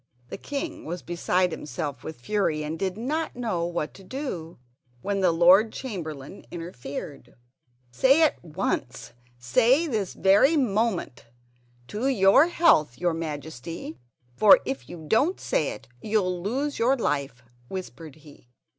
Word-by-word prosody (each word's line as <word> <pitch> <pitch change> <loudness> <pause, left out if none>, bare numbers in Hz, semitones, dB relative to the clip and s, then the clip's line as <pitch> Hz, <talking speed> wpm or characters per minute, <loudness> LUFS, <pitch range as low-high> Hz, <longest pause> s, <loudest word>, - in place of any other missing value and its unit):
The - - -6
king 290 +3 -5
was 175 +2 -6
beside 175 +1 0
himself 150 -2 -5
with 160 -5 -8
fury 160 -3 0
and 155 +2 -5
did 190 0 -2
not 300 +8 -2
know 220 -9 -2
what 170 -3 -3
to 195 - -14
do, 185 - -6 0.5
when 200 0 -1
the 185 -3 +3
Lord 180 +6 +5
Chamberlain 165 - -7
interfered: 145 -5 -8 0.6
"Say 270 - +4
at 305 - +1
once—say 130 - -1
this 220 - -2
very 205 +12 +4
moment: 210 - -1 0.6
'To 215 - -2
your 245 - +5
health, 300 - +3
your 175 -1 0
Majesty'; 160 -1 -6 0.4
for 210 - +7
if 130 -3 -5
you 160 -2 -9
don't 290 - +2
say 150 - 0
it 115 - -9
you'll 185 -5 0
lose 270 +9 -2
your 255 +4 +3
life, 140 - -2 0.3
whispered 160 -5 -7
he. 145 -5 -18
180 Hz, 135 wpm, -26 LUFS, 150-225 Hz, 0.6 s, for